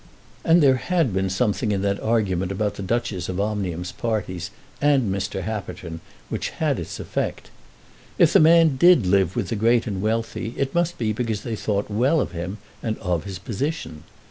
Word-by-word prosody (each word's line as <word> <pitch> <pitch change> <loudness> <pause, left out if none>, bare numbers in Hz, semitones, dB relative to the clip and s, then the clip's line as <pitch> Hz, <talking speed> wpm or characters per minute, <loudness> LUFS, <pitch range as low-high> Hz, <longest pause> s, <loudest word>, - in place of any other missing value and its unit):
And 165 0 +5
there 135 -2 +5
had 165 - 0
been 95 0 0
something 105 +3 0
in 100 -1 0
that 100 0 0
argument 95 -5 0
about 105 +1 -1
the - - -8
Duchess 100 -3 -2
of 90 +1 -3
Omnium's 95 -4 -2
parties, 95 -5 -3 0.3
and 135 -8 +3
Mr. 95 0 -3
Happerton, 95 -5 -5 0.3
which - - -3
had - - -1
its - - -6
effect. - - -3 0.7
If - - +5
the - - +7
man 160 -3 +6
did 175 - +6
live 95 -1 +2
with 95 - -2
the - - -1
great 115 +2 +3
and 100 -5 -3
wealthy, 115 +1 -2
it 135 -1 -1
must 175 0 0
be 110 -2 0
because 110 -2 -2
they 115 -2 -3
thought 105 -1 -2
well 130 +10 +3
of 130 - -1
him 90 +4 -5 0.2
and 110 -1 -2
of 90 -5 -2
his 95 -2 -5
position. 100 - -4
105 Hz, 185 wpm, -23 LUFS, 95-120 Hz, 0.7 s, the